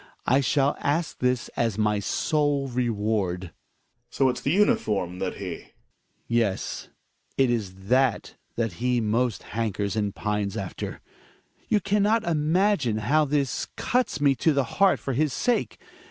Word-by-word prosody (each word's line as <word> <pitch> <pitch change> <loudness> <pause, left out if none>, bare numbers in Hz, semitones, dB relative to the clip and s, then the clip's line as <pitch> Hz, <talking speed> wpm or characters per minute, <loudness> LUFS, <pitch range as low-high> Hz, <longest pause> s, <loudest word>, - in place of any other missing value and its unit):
I 135 +3 +4
shall 135 +3 +2
ask 155 +4 -1
this 125 -1 0
as 115 -3 -1
my 105 -1 +1
sole 145 - 0
reward. 110 -7 -1
Gregers. 85 -3 -10 0.6
So 135 +1 +2
it's 125 0 -3
the 140 - -1
uniform 105 - +1
that 95 - -2
he? 95 -4 -5
Hjalmar. - - -19 0.6
Yes; 115 -5 -1 0.5
it 130 -2 +3
is 105 -6 -2
that 130 0 +2 0.2
that 115 -4 -1
he 125 0 +2
most 115 -1 0
hankers 105 -3 -2
and 105 -2 -1
pines 105 -1 -2
after. 95 -3 -5 0.7
You 210 - +3
can 200 +2 +1
not 220 +2 +3
imagine 160 - +1
how 150 +9 +2
this 140 -2 -1
cuts 250 - 0
me 140 -1 +4
to 160 +5 +3
the 140 -1 +2 0.2
heart 195 -1 +5
for 135 - -3
his 145 +1 +1
sake. 245 -1 0
125 Hz, 155 wpm, -25 LUFS, 105-145 Hz, 0.7 s, heart